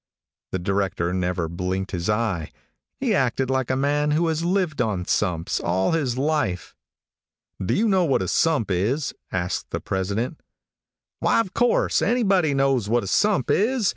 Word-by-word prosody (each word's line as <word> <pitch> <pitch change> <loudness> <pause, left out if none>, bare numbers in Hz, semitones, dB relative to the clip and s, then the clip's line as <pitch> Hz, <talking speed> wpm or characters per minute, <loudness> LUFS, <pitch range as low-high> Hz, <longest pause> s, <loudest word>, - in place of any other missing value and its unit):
The - - -1
director 95 -2 -1
never 90 -2 -1
blinked 90 +3 -3
his 90 +1 -3
eye. 105 -7 -1 0.5
He - - +1
acted 130 0 +1
like 130 -2 0
a 130 - +1
man 145 +2 +1
who 160 +3 +2
has 160 0 -1
lived 175 -5 0
on 105 -6 -1
sumps 85 -3 0
all 95 +2 +1
his 140 -7 0
life. 135 - -1 0.9
"Do 90 - 0
you 225 +3 +2
know 190 -3 +3
what 135 - +1
a - - -3
sump 145 - +1
is?" 115 - 0 0.2
asked 90 0 -2
the - - -3
president. 100 - -3 0.8
"Why, - - +2
of 195 -5 -1
course, 240 0 +2
anybody 195 - +2
knows 135 -6 +1
what 120 +1 +2
a - - -5
sump 200 - +2
is. 225 0 +2
125 Hz, 165 wpm, -23 LUFS, 95-160 Hz, 0.9 s, know